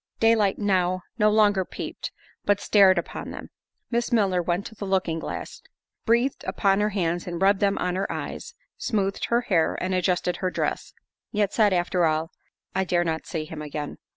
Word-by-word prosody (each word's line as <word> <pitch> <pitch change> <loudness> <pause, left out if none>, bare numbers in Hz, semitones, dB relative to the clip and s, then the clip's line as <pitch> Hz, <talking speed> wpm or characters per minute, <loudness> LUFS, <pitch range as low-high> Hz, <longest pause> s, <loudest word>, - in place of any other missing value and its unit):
Daylight 225 -3 +3
now 185 -3 +1 0.2
no 210 0 +5
longer 210 -3 +4
peeped, - - -6 0.3
but 205 0 +2
stared 195 -3 +5
upon 170 - -4
them. - - -8 0.4
Miss 235 +1 0
Milner 195 -6 +3
went 175 +3 -1
to - - -8
the 205 -2 -6
looking 185 -4 0
glass, - - -6 0.5
breathed 235 +4 +2
upon 195 -1 +2
her 210 0 +2
hands 175 -4 -1
and 175 -1 -4
rubbed 195 +1 +4
them 200 -1 +2
on 180 0 -1
her 195 +1 -2
eyes, - - -6 0.2
smoothed 200 -4 -1
her 235 +1 +2
hair 175 -9 +1
and 185 0 -2
adjusted 180 -1 +1
her 185 - -1
dress; - - -3 0.4
yet 205 -3 0
said, 215 -3 +4
after 175 -1 +2
all, 160 +2 0 0.4
"I 190 - +1
dare 175 -1 +1
not 160 -1 -3
see 155 -2 -3
him 155 0 -7
again." 150 0 -5
190 Hz, 180 wpm, -25 LUFS, 175-205 Hz, 0.5 s, no